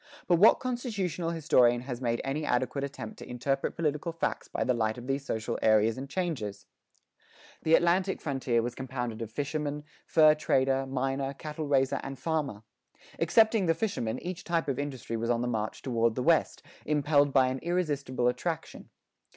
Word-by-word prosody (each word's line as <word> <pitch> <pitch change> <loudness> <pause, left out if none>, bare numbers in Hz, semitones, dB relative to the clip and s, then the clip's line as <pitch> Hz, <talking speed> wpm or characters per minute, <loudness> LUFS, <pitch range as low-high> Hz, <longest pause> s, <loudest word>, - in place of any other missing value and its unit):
But 175 -2 +3
what 210 - +7
constitutional 205 - -2
historian 125 -7 +3
has 125 -1 -6
made 120 -2 0
any 140 +3 -2
adequate 130 +1 0
attempt 140 +10 -6
to - - -10
interpret 135 +3 -1
political 155 +1 -1
facts 165 - -3
by - - -2
the 125 - +2
light 110 -1 0
of 120 - -8
these 135 +1 -1
social 110 -5 -3
areas 110 0 +4
and 135 +1 -7
changes?[12:1] 110 - -6 0.4
The 160 +1 +6
Atlantic 185 +3 +2
frontier 130 -5 0
was 120 0 -3
compounded 125 -3 -5
of 115 - -4
fisherman, 145 +3 -3 0.2
fur 155 -2 +6
trader, 135 -3 +1
miner, 135 +1 -2
cattle 155 +1 -5
raiser, 135 -2 +2
and 135 0 -6
farmer. 150 -10 -2 0.6
Excepting 220 +3 +4
the 165 - +3
fisherman, 130 - -2
each 180 -1 -5
type 170 -2 -1
of 140 -2 -1
industry 130 -5 -4
was 115 +1 -2
on 120 -1 +2
the - - -1
march 110 -3 -3
toward 115 -3 +1
the 125 - -1
West, 165 +1 +2 0.2
impelled 145 -1 +2
by 130 -2 +4
an 130 +1 -3
irresistible 145 -8 -1
attraction. 160 +6 -3
135 Hz, 170 wpm, -29 LUFS, 125-160 Hz, 0.6 s, what